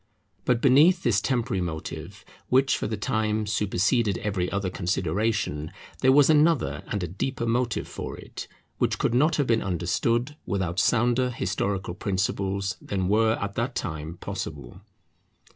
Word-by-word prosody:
But 125 Hz, -2 st, +2 dB
beneath 155 Hz, +7 st, +5 dB
this 105 Hz, -4 st, +2 dB
temporary 120 Hz, -7 st, 0 dB
motive, 80 Hz, -3 st, -6 dB, 0.2 s
which 135 Hz, +1 st, +4 dB
for -, -, -2 dB
the 110 Hz, 0 st, -3 dB
time 110 Hz, +1 st, 0 dB
superseded 100 Hz, +1 st, +1 dB
every 100 Hz, -4 st, -2 dB
other 100 Hz, -2 st, -1 dB
consideration, 90 Hz, -3 st, -1 dB, 0.3 s
there 130 Hz, -, +5 dB
was 145 Hz, 0 st, +6 dB
another 155 Hz, -1 st, +3 dB
and 100 Hz, -3 st, -2 dB
a -, -, -2 dB
deeper 115 Hz, +8 st, -3 dB
motive 120 Hz, +1 st, 0 dB
for -, -, -6 dB
it, -, -, -8 dB, 0.3 s
which -, -, +1 dB
could -, -, 0 dB
not 150 Hz, +6 st, +3 dB
have 145 Hz, -, +1 dB
been 115 Hz, -2 st, +2 dB
understood 115 Hz, -, 0 dB
without 90 Hz, -1 st, -2 dB
sounder 120 Hz, +2 st, +2 dB
historical 100 Hz, -4 st, -2 dB
principles 95 Hz, 0 st, -1 dB
than 95 Hz, -2 st, -2 dB
were 110 Hz, +2 st, +3 dB
at 100 Hz, 0 st, -3 dB
that 120 Hz, +4 st, -2 dB
time 80 Hz, 0 st, -4 dB
possible. 60 Hz, +4 st, -6 dB
105 Hz, 145 wpm, -26 LUFS, 95-125 Hz, 0.3 s, was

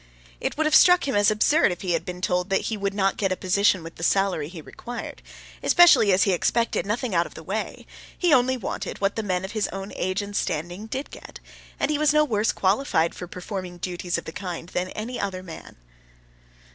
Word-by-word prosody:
It -, -, -3 dB
would 315 Hz, -, +1 dB
have 305 Hz, -, +1 dB
struck 360 Hz, -4 st, +6 dB
him 270 Hz, -, -1 dB
as 205 Hz, 0 st, +4 dB
absurd 215 Hz, -, +3 dB
if 175 Hz, -, -6 dB
he 185 Hz, -, -2 dB
had 170 Hz, -, 0 dB
been 180 Hz, 0 st, -6 dB
told 180 Hz, 0 st, 0 dB
that 195 Hz, -, +2 dB
he 225 Hz, -, -2 dB
would 200 Hz, -1 st, -3 dB
not 195 Hz, -1 st, +1 dB
get 195 Hz, -2 st, 0 dB
a -, -, +1 dB
position 185 Hz, 0 st, +2 dB
with 165 Hz, +1 st, -10 dB
the 165 Hz, -, -7 dB
salary 190 Hz, -5 st, +1 dB
he 175 Hz, -1 st, -9 dB
required, 240 Hz, +9 st, -8 dB, 0.4 s
especially 345 Hz, -, +6 dB
as 185 Hz, +1 st, +4 dB
he 195 Hz, -, +2 dB
expected 230 Hz, +4 st, 0 dB
nothing 230 Hz, +1 st, -2 dB
out 170 Hz, 0 st, +2 dB
of -, -, -17 dB
the 160 Hz, -, -9 dB
way; 205 Hz, +6 st, -4 dB, 0.3 s
he 350 Hz, -4 st, +3 dB
only 260 Hz, 0 st, +3 dB
wanted 225 Hz, -, -5 dB
what 200 Hz, 0 st, 0 dB
the 225 Hz, -, -1 dB
men 185 Hz, -3 st, -2 dB
of 190 Hz, -, -7 dB
his 215 Hz, -1 st, -1 dB
own 195 Hz, +1 st, -7 dB
age 185 Hz, +2 st, -1 dB
and 205 Hz, 0 st, -8 dB
standing 175 Hz, +7 st, -3 dB
did 265 Hz, +5 st, -5 dB
get, -, -, -11 dB, 0.4 s
and -, -, +1 dB
he 295 Hz, -, 0 dB
was 300 Hz, -1 st, +3 dB
no 300 Hz, 0 st, +5 dB
worse 220 Hz, -5 st, +1 dB
qualified 190 Hz, -5 st, +1 dB
for 180 Hz, -, -8 dB
performing 180 Hz, 0 st, -6 dB
duties 175 Hz, 0 st, -3 dB
of 170 Hz, -, -6 dB
the -, -, -6 dB
kind 175 Hz, -2 st, -6 dB
than 180 Hz, +1 st, -2 dB
any 230 Hz, +4 st, -5 dB
other 190 Hz, -2 st, -3 dB
man. 165 Hz, -3 st, -10 dB
195 Hz, 225 wpm, -24 LUFS, 180-225 Hz, 0.4 s, struck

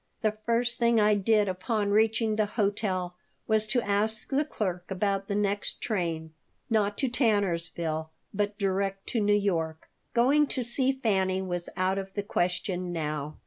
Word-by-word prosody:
The 215 Hz, -1 st, +2 dB
first 235 Hz, +1 st, +2 dB
thing 235 Hz, -1 st, +4 dB
I 210 Hz, 0 st, +5 dB
did 210 Hz, +1 st, +3 dB
upon 200 Hz, +3 st, -1 dB
reaching 220 Hz, +1 st, +2 dB
the 215 Hz, -1 st, +1 dB
hotel 200 Hz, -4 st, -1 dB, 0.3 s
was 220 Hz, -1 st, +2 dB
to 235 Hz, +2 st, +1 dB
ask 215 Hz, +2 st, 0 dB
the 275 Hz, +2 st, +3 dB
clerk 185 Hz, -, -3 dB
about 195 Hz, 0 st, -1 dB
the 200 Hz, -, -1 dB
next 205 Hz, 0 st, -1 dB
train 165 Hz, -6 st, -2 dB, 0.4 s
not 205 Hz, -2 st, +2 dB
to 270 Hz, -, +1 dB
Tannersville, 170 Hz, -, 0 dB, 0.2 s
but 205 Hz, 0 st, -1 dB
direct 195 Hz, -1 st, -1 dB
to 235 Hz, -, 0 dB
New 205 Hz, 0 st, +4 dB
York. 165 Hz, -6 st, -2 dB, 0.2 s
Going 280 Hz, +5 st, +4 dB
to 255 Hz, -, -2 dB
see 255 Hz, +3 st, +2 dB
Fanny 195 Hz, -8 st, +1 dB
was 175 Hz, -2 st, -3 dB
out 185 Hz, +1 st, +1 dB
of 195 Hz, 0 st, -8 dB
the 205 Hz, -, -1 dB
question 180 Hz, -1 st, -1 dB
now. 150 Hz, -2 st, -3 dB
205 Hz, 160 wpm, -28 LUFS, 185-220 Hz, 0.4 s, I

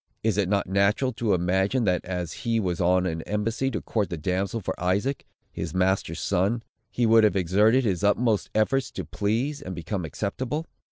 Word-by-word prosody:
Is 110 Hz, -3 st, +2 dB
it 95 Hz, -3 st, +1 dB
not 100 Hz, -1 st, +1 dB
natural 100 Hz, +7 st, +2 dB
to 110 Hz, -3 st, +1 dB
imagine, 95 Hz, +8 st, +1 dB
that, 90 Hz, -4 st, +1 dB
as 90 Hz, -3 st, -4 dB
he 115 Hz, -1 st, +1 dB
was 90 Hz, -4 st, -1 dB
on 90 Hz, +1 st, +3 dB
an 80 Hz, -2 st, -2 dB
embassy 110 Hz, +7 st, -1 dB
to 110 Hz, -5 st, -3 dB
court 105 Hz, -4 st, -1 dB
the 85 Hz, -, -4 dB
damsel 95 Hz, +7 st, -1 dB
for 100 Hz, -, -3 dB
Isaac, 100 Hz, +10 st, 0 dB, 0.2 s
his -, -, -5 dB
master's 95 Hz, -3 st, +1 dB
son, 100 Hz, +5 st, 0 dB, 0.3 s
he 120 Hz, -, 0 dB
would 115 Hz, 0 st, +6 dB
have 105 Hz, -, +3 dB
exerted 105 Hz, +8 st, +3 dB
his 100 Hz, -4 st, -1 dB
utmost 105 Hz, +1 st, +2 dB
efforts 130 Hz, +5 st, +2 dB
to -, -, -5 dB
please, 120 Hz, +8 st, -1 dB
and 90 Hz, 0 st, -6 dB
become 90 Hz, +2 st, -4 dB
acceptable? 125 Hz, -, -3 dB
100 Hz, 185 wpm, -26 LUFS, 90-115 Hz, 0.3 s, would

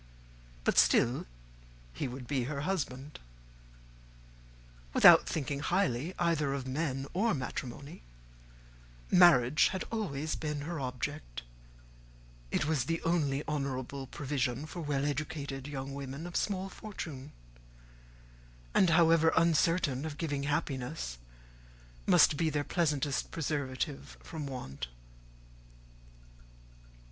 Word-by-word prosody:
But -, -, +4 dB
still 120 Hz, -, +3 dB, 0.7 s
he -, -, -3 dB
would 125 Hz, 0 st, -7 dB
be 130 Hz, -2 st, -1 dB
her 140 Hz, +1 st, -3 dB
husband. 145 Hz, -5 st, -3 dB, 1.8 s
Without -, -, +8 dB
thinking 145 Hz, -2 st, -2 dB
highly 175 Hz, -1 st, 0 dB
either 160 Hz, -5 st, +1 dB
of 135 Hz, -2 st, -4 dB
men 135 Hz, 0 st, -2 dB
or 215 Hz, +6 st, +2 dB
of 170 Hz, -, +1 dB
matrimony, 135 Hz, +5 st, -6 dB, 1.1 s
marriage 155 Hz, -6 st, +6 dB
had 190 Hz, -1 st, -3 dB
always 160 Hz, -9 st, -2 dB
been 150 Hz, -2 st, -3 dB
her 165 Hz, +2 st, -4 dB
object: 90 Hz, -, -4 dB, 1.1 s
it 140 Hz, -, 0 dB
was 150 Hz, -5 st, +1 dB
the 165 Hz, +2 st, -1 dB
only 150 Hz, -4 st, +1 dB
honourable 135 Hz, -2 st, -3 dB
provision 135 Hz, -1 st, -2 dB
for 170 Hz, +2 st, -7 dB
well 145 Hz, -2 st, -1 dB
educated 145 Hz, -2 st, -3 dB
young 135 Hz, -1 st, -5 dB
women 140 Hz, +3 st, -6 dB
of 175 Hz, -, -8 dB
small 195 Hz, -2 st, 0 dB
fortune, 160 Hz, -9 st, -7 dB, 1.4 s
and, 185 Hz, -, +5 dB
however 165 Hz, -1 st, +5 dB
uncertain 165 Hz, -4 st, +3 dB
of 155 Hz, -2 st, -5 dB
giving 145 Hz, -4 st, -2 dB
happiness, 125 Hz, -, -2 dB, 0.9 s
must 145 Hz, -, +6 dB
be 165 Hz, 0 st, +2 dB
their 145 Hz, -1 st, -1 dB
pleasantest 150 Hz, -4 st, 0 dB
preservative 140 Hz, -2 st, -3 dB
from 155 Hz, -3 st, -6 dB
want. 70 Hz, -, -6 dB
145 Hz, 110 wpm, -31 LUFS, 135-165 Hz, 1.8 s, Without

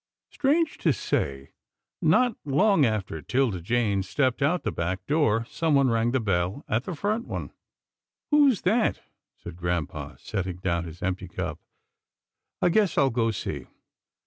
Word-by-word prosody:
Strange 300 Hz, +3 st, +1 dB
to 165 Hz, -, +3 dB
say, 70 Hz, -, -2 dB, 0.5 s
not 225 Hz, +9 st, +3 dB
long 155 Hz, -, +3 dB
after 100 Hz, -7 st, -3 dB
'Tilda 120 Hz, -, 0 dB
Jane 105 Hz, 0 st, +1 dB
stepped 130 Hz, +6 st, 0 dB
out 160 Hz, +6 st, +2 dB
the -, -, -1 dB
back 90 Hz, +3 st, -3 dB
door, 115 Hz, -7 st, +2 dB
someone 140 Hz, -5 st, +2 dB
rang 115 Hz, +1 st, +2 dB
the 130 Hz, +2 st, +1 dB
bell 100 Hz, +4 st, -1 dB
at 120 Hz, -2 st, 0 dB
the 185 Hz, -, -4 dB
front 215 Hz, -, -1 dB
one. -, -, -5 dB, 0.4 s
" -, -, -65 dB
Who's 285 Hz, -7 st, +5 dB
that? 220 Hz, +5 st, +2 dB, 0.2 s
" -, -, -63 dB
said 85 Hz, -1 st, -8 dB
grampa, 85 Hz, -3 st, -3 dB
setting 95 Hz, -4 st, -4 dB
down 85 Hz, -2 st, -1 dB
his 85 Hz, +1 st, -9 dB
empty 95 Hz, 0 st, -2 dB
cup. 90 Hz, -, -4 dB, 0.5 s
" -, -, -62 dB
I 180 Hz, -, +5 dB
guess 205 Hz, +1 st, +2 dB
I'll 135 Hz, -1 st, +4 dB
go 115 Hz, -1 st, +1 dB
see. 110 Hz, -, -4 dB
120 Hz, 160 wpm, -26 LUFS, -, 0.5 s, Who's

